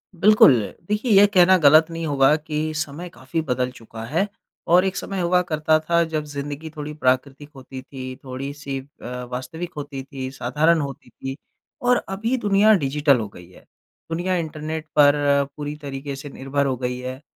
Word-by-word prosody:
बिल्कुल, 210 -1 +7 0.4
देखिए 210 +3 -1
ये 205 - +8
कहना 185 -2 +5
गलत 155 0 +6
नहीं 165 0 -4
होगा 140 +1 +4
कि 155 0 -3
समय 155 +3 -4
काफ़ी 130 +5 -4
बदल 125 -3 -1
चुका 115 -2 -10
है, 165 - 0 0.4
और 180 +3 +5
एक 190 - -1
समय 195 -1 -4
हुआ 180 +1 +3
करता 155 0 +2
था 170 +2 +2
जब 155 -2 -2
ज़िंदगी 145 +2 -6
थोड़ी 150 0 -5
प्राकृतिक 135 +1 -1
होती 130 0 -9
थी, 130 -1 -8
थोड़ी-सी 135 +1 -5
अ, 125 -2 -8
वास्तविक 160 +8 -5
होती 140 -2 -6
थी, 135 -1 -6
साधारण 150 +6 +2
होती 140 -2 -7
थी, 135 0 -7 0.5
और 245 0 +3
अभी 225 +6 -1
दुनिया 210 -1 +4
डिजिटल 140 0 +3
हो 110 - -3
गई 90 -2 -14
है। - - -18 0.5
दुनिया 180 +3 0
इंटरनेट 155 -1 -4
पर 145 -1 +7 0.4
पूरी 145 0 -4
तरीके 140 0 -5
से 135 +2 -8
निर्भर 135 +1 -2
हो 135 -2 0
गई 125 0 -3
है 130 +1 -6
145 Hz, 175 wpm, -22 LUFS, 135-165 Hz, 0.5 s, ये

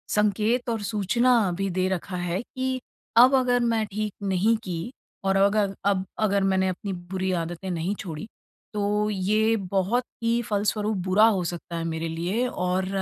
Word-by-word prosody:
संकेत 215 +4 +1
और 225 -2 -1
सूचना 220 +1 +2
भी 195 0 -1
दे 185 +1 0
रखा 185 0 -3
है 175 +2 -2
कि 260 +1 -3 0.4
अब 250 +3 +8
अगर 250 -2 +3
मैं 230 -2 +1
ठीक 210 0 -3
नहीं 195 +4 +3
की, 180 +2 -4 0.3
और 195 0 +2
अगर 200 0 +3
अब 195 -1 +2
अगर 200 -2 +2
मैंने 190 -1 +2
अपनी 190 +2 -3
बुरी 185 +1 -3
आदतें 175 +1 -3
नहीं 175 +3 -1
छोड़ी, 165 -4 -6 0.5
तो 210 0 0
ये 215 +3 +2 0.2
बहुत 200 +6 +2 0.2
ही 230 +1 +2
फलस्वरूप 210 +1 0
बुरा 200 +4 +6
हो 195 -5 +2
सकता 170 0 -5
है 165 - -2
मेरे 165 0 -2
लिए 180 +10 -1
और 185 -4 -1
200 Hz, 165 wpm, -25 LUFS, 185-220 Hz, 0.5 s, अब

